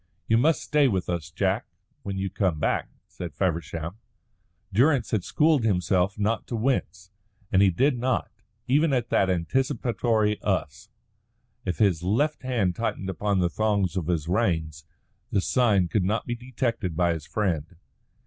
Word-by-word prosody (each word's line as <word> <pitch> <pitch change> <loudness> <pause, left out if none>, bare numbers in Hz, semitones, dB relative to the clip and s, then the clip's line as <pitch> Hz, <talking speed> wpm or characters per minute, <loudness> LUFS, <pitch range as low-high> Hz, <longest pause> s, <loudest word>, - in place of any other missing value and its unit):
"You 110 - +3
must 155 +5 +2
stay 150 -2 +3
with 95 -7 -1
us, 85 -3 -3
Jack, 80 - -1 0.3
when 100 -1 -4
you 95 0 -2
come 90 -6 0
back," - - 0 0.2
said 85 -5 -8
Feversham. 85 +1 -2 0.8
Durrance 125 +2 +3
had 105 -5 0
schooled 150 +5 +2
himself 95 -1 +1
not 105 +2 -1
to 120 - -3
wince, 95 -7 -1 0.4
and 95 - +4
he 100 - +6
did 130 - +1
not, 125 0 -1 0.4
even 145 +3 +3
at 125 -2 -1
that 95 - +3
anticipatory 110 - 0
"us." - - -2 0.8
If 90 -4 -2
his 90 -5 +2
left 120 - 0
hand 115 -9 0
tightened 95 -4 -2
upon 100 +3 -1
the 85 - +2
thongs 100 -4 0
of 90 -4 -2
his 80 -3 -1
reins, 80 -6 -1 0.4
the 100 - +1
sign 100 -4 +2
could 100 +2 0
not 105 +5 0
be 120 - -2
detected 120 -7 -3
by 85 -1 +3
his 80 -2 -7
friend. 90 -5 -2
100 Hz, 160 wpm, -26 LUFS, 90-120 Hz, 0.8 s, he